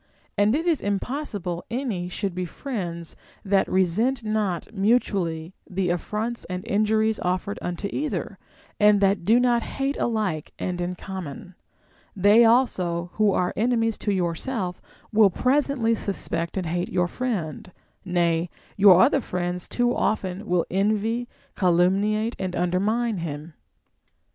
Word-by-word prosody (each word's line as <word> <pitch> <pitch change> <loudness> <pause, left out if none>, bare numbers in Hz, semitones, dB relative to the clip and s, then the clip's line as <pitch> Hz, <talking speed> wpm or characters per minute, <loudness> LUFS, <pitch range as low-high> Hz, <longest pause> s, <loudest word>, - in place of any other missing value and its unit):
And 205 +4 +3
it 325 +3 -1
is 335 -4 +2
impossible 200 - -3
any 230 -8 -3
should 195 0 -3
be 180 +1 -3
friends 175 - -5 0.3
that 195 0 +2
resent 215 +8 +1
not 215 -3 -2
mutually 195 -6 0 0.2
the 185 -1 0
affronts 215 +6 -3
and 180 0 -5
injuries 215 +1 +1
offered 185 +3 -2
unto 175 +3 -3
either, 300 +1 -3 0.4
and 210 -1 +5
that 195 -2 +2
do 230 +4 +5
not 240 -1 +3
hate 275 +3 -3
alike 210 -10 -1
and 180 -1 -3
in 180 +1 -2
common. 185 -2 -7 0.6
They 205 +4 +6
also 180 -8 +2
who 215 -2 +3
are 180 -1 0
enemies 225 0 +1
to 205 - -1
yourself 180 +2 -2 0.3
will 215 -2 +6
presently 255 +1 +1
suspect 190 -5 -2
and 185 - -1
hate 175 +2 -2
your 180 -1 +1
friend; 185 - -4 0.3
nay, 170 -2 +1 0.3
your 195 -3 +7
other 275 +2 +3
friends 180 -3 -3
too 245 - 0
will 245 - +1
often 185 -3 0
envy, 215 +5 0 0.3
calumniate, 195 +5 +2
and 185 -1 -3
undermine 205 +6 0
him. 155 0 -6
200 Hz, 135 wpm, -24 LUFS, 180-225 Hz, 0.6 s, your